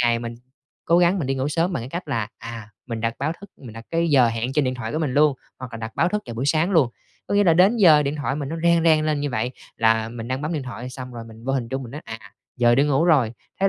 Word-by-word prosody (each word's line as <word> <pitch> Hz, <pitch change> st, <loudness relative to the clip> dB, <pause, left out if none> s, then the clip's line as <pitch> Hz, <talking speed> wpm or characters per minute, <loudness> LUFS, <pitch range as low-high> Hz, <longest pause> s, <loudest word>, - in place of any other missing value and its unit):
3 120 Hz, -, +3 dB
ngày 115 Hz, 0 st, +2 dB
mình 115 Hz, 0 st, -6 dB, 0.5 s
cố 170 Hz, +2 st, +4 dB
gắng 180 Hz, +2 st, +3 dB
mình 145 Hz, -, -2 dB
đi 135 Hz, -, 0 dB
ngủ 135 Hz, +2 st, -1 dB
sớm 170 Hz, +4 st, 0 dB
bằng 145 Hz, -, -2 dB
cái 120 Hz, -, -7 dB
cách 175 Hz, +3 st, -5 dB
là, 115 Hz, -3 st, -1 dB
à, 115 Hz, -2 st, -8 dB, 0.2 s
mình 115 Hz, -2 st, -4 dB
đặt 115 Hz, 0 st, -1 dB
báo 140 Hz, +4 st, -1 dB
thức, 200 Hz, -1 st, -12 dB
mình 120 Hz, -5 st, -11 dB
đặt 115 Hz, +1 st, -10 dB
cái 170 Hz, 0 st, +1 dB
giờ 130 Hz, -4 st, +5 dB
hẹn 115 Hz, +3 st, -2 dB
trên 150 Hz, 0 st, +2 dB
điện 130 Hz, 0 st, -1 dB
thoại 115 Hz, -3 st, -5 dB
của 155 Hz, -, -1 dB
mình 145 Hz, -6 st, -1 dB
luôn, 150 Hz, -1 st, +4 dB, 0.2 s
hoặc 125 Hz, -2 st, -8 dB
là -, -, -5 dB
đặt 110 Hz, 0 st, -7 dB
báo -, -, +3 dB
thức 210 Hz, +3 st, -2 dB
vào 120 Hz, -, -6 dB
buổi 125 Hz, +4 st, -2 dB
sáng 160 Hz, +5 st, +2 dB
luôn. 155 Hz, -10 st, +3 dB, 0.4 s
Có -, -, -2 dB
nghĩa 205 Hz, 0 st, +4 dB
là 165 Hz, -3 st, +5 dB
đến 190 Hz, +7 st, +5 dB
giờ 160 Hz, -9 st, +6 dB
điện 145 Hz, +1 st, -2 dB
thoại 145 Hz, -2 st, -2 dB
mình 140 Hz, -2 st, -4 dB
nó 165 Hz, -, -4 dB
reng 170 Hz, -1 st, +4 dB
reng 155 Hz, -2 st, +4 dB
lên 150 Hz, -2 st, 0 dB
như 145 Hz, -1 st, -2 dB
vậy, 120 Hz, +1 st, -1 dB, 0.3 s
là 110 Hz, 0 st, +2 dB
mình 115 Hz, 0 st, -7 dB
đang 130 Hz, +2 st, -2 dB
bấm 155 Hz, -, -2 dB
điện 150 Hz, -4 st, -2 dB
thoại 125 Hz, 0 st, -7 dB
xong 125 Hz, -1 st, -8 dB
rồi 115 Hz, -1 st, -7 dB
mình 115 Hz, 0 st, -13 dB
vô 135 Hz, -, -1 dB
hình 125 Hz, -4 st, -1 dB
chung 135 Hz, +2 st, -3 dB
mình 120 Hz, 0 st, -9 dB
nói, 150 Hz, -, -6 dB
à, 115 Hz, 0 st, -7 dB, 0.4 s
giờ 120 Hz, -1 st, +4 dB
đi 135 Hz, -, +4 dB
ngủ 145 Hz, +2 st, +2 dB
rồi, 140 Hz, -10 st, +3 dB, 0.3 s
thế 195 Hz, -, +4 dB
135 Hz, 315 wpm, -23 LUFS, 115-160 Hz, 0.5 s, giờ